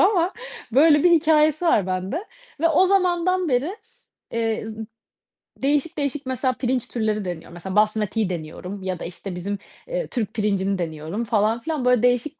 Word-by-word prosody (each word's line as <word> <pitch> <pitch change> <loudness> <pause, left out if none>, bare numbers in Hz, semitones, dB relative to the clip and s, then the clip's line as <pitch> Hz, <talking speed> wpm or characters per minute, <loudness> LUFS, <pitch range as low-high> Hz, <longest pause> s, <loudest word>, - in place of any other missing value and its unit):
ama 375 -2 +4 0.4
böyle 295 +3 +5
bir 355 - +7
hikâyesi 310 0 +4
var 210 - +3
bende. 190 - -2 0.4
Ve 330 - +4
o 330 +4 +4
zamandan 365 -1 +2
beri, 285 - 0 0.6
eee, 225 -1 -1
z 220 -1 -7 0.8
değişik 290 +3 +1
değişik, 285 0 -2
mesela, 260 0 0
pirinç 250 -1 -1
türleri 215 -3 -1
deniyorum. 170 -2 -6
Mesela, 185 +2 -6
Basmati'yi 215 -1 +2
deniyorum 180 +3 -6
ya 185 -2 -3
da - - -5
işte, 180 +2 -7
bizim, 200 +3 -3 0.3
eee, - - -2
Türk 230 -5 -3
pirincini 200 -2 0
deniyorum 165 +5 -4
falan 225 0 +1
filan. 290 +1 -3
Böyle 250 -2 +4
değişik 250 +5 +1
240 Hz, 160 wpm, -23 LUFS, 200-305 Hz, 0.8 s, bir